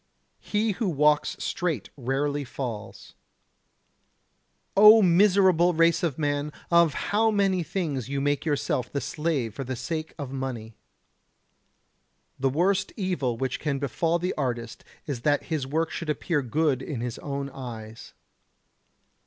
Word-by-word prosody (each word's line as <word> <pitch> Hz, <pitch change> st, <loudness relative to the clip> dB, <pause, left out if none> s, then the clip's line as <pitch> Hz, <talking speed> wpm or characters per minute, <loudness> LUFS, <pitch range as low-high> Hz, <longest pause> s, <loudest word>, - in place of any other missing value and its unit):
He 215 Hz, +1 st, 0 dB
who 205 Hz, 0 st, -1 dB
walks 150 Hz, -1 st, +2 dB
straight 165 Hz, -, -2 dB
rarely 140 Hz, +2 st, -1 dB
falls. 120 Hz, -5 st, -7 dB, 1.6 s
O 215 Hz, +2 st, +9 dB
miserable 180 Hz, -1 st, +4 dB
race 165 Hz, +1 st, +3 dB
of 160 Hz, -7 st, -1 dB
man! 145 Hz, -1 st, -1 dB, 0.2 s
of 170 Hz, -3 st, +5 dB
how 220 Hz, +2 st, +1 dB
many 195 Hz, -3 st, +2 dB
things 150 Hz, -, -3 dB
you 140 Hz, 0 st, -1 dB
make 145 Hz, +1 st, 0 dB
yourself 145 Hz, -5 st, -1 dB
the 140 Hz, -, -1 dB
slave 150 Hz, -8 st, -2 dB
for 135 Hz, -, -5 dB
the 130 Hz, 0 st, -4 dB
sake 155 Hz, +6 st, -4 dB
of 140 Hz, -4 st, -6 dB
money! 125 Hz, -5 st, -5 dB, 1.7 s
The 135 Hz, 0 st, +2 dB
worst 180 Hz, +8 st, +1 dB
evil 145 Hz, -, -1 dB
which 130 Hz, +1 st, -2 dB
can 150 Hz, -3 st, -1 dB
befall 160 Hz, +5 st, 0 dB
the 180 Hz, +2 st, -2 dB
artist 120 Hz, -4 st, -4 dB, 0.2 s
is 135 Hz, -5 st, -4 dB
that 145 Hz, +2 st, +2 dB
his 140 Hz, -4 st, -1 dB
work 160 Hz, +3 st, -1 dB
should 165 Hz, -, -5 dB
appear 150 Hz, +1 st, 0 dB
good 140 Hz, +1 st, 0 dB
in 135 Hz, -4 st, -5 dB
his 120 Hz, -1 st, -4 dB
own 140 Hz, -1 st, -4 dB
eyes. 115 Hz, -4 st, -9 dB
145 Hz, 135 wpm, -26 LUFS, 130-170 Hz, 1.7 s, O